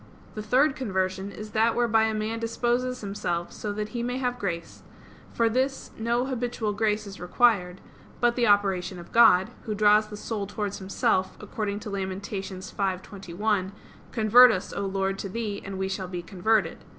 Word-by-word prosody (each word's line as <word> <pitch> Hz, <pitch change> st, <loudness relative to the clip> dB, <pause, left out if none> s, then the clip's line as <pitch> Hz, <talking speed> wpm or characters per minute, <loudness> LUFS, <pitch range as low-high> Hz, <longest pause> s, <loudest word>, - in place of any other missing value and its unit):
The 215 Hz, -, -5 dB
third 265 Hz, +7 st, +3 dB
conversion 190 Hz, -5 st, -2 dB
is 215 Hz, +1 st, -9 dB
that 225 Hz, +1 st, +2 dB
whereby 225 Hz, -2 st, +3 dB
a 220 Hz, 0 st, -1 dB
man 215 Hz, +1 st, -2 dB
disposes 240 Hz, +2 st, -1 dB
himself 175 Hz, -4 st, -3 dB
so 210 Hz, -, -5 dB
that 210 Hz, 0 st, -4 dB
he 240 Hz, 0 st, -4 dB
may 245 Hz, +1 st, -2 dB
have 250 Hz, -1 st, -2 dB
grace; 170 Hz, -5 st, -4 dB, 0.5 s
for 230 Hz, -, +2 dB
this 260 Hz, +4 st, -1 dB
no 235 Hz, +2 st, 0 dB
habitual 245 Hz, -4 st, -2 dB
grace 210 Hz, 0 st, 0 dB
is 195 Hz, -1 st, -9 dB
required; 180 Hz, -1 st, +2 dB, 0.4 s
but 240 Hz, 0 st, +3 dB
the 240 Hz, -2 st, +2 dB
operation 195 Hz, -3 st, +2 dB
of 175 Hz, -, -11 dB
God, 225 Hz, -3 st, +6 dB
Who 215 Hz, -2 st, -2 dB
draws 210 Hz, +1 st, +4 dB
the 210 Hz, 0 st, -8 dB
soul 210 Hz, -2 st, -4 dB
towards 205 Hz, 0 st, -4 dB
Himself, 190 Hz, -1 st, 0 dB
according 210 Hz, 0 st, -4 dB
to 210 Hz, -, -6 dB
Lament. 195 Hz, 0 st, -4 dB
5:21: 190 Hz, 0 st, -3 dB, 0.4 s
"Convert 235 Hz, +3 st, +7 dB
us, 185 Hz, -3 st, -3 dB
O 200 Hz, -, -2 dB
Lord, 195 Hz, 0 st, -1 dB
to 195 Hz, -, -4 dB
Thee, 210 Hz, 0 st, -4 dB
and 195 Hz, 0 st, -6 dB
we 190 Hz, 0 st, -1 dB
shall 190 Hz, -1 st, -4 dB
be 175 Hz, -1 st, -5 dB
converted." 205 Hz, +5 st, 0 dB
210 Hz, 175 wpm, -26 LUFS, 190-230 Hz, 0.5 s, Convert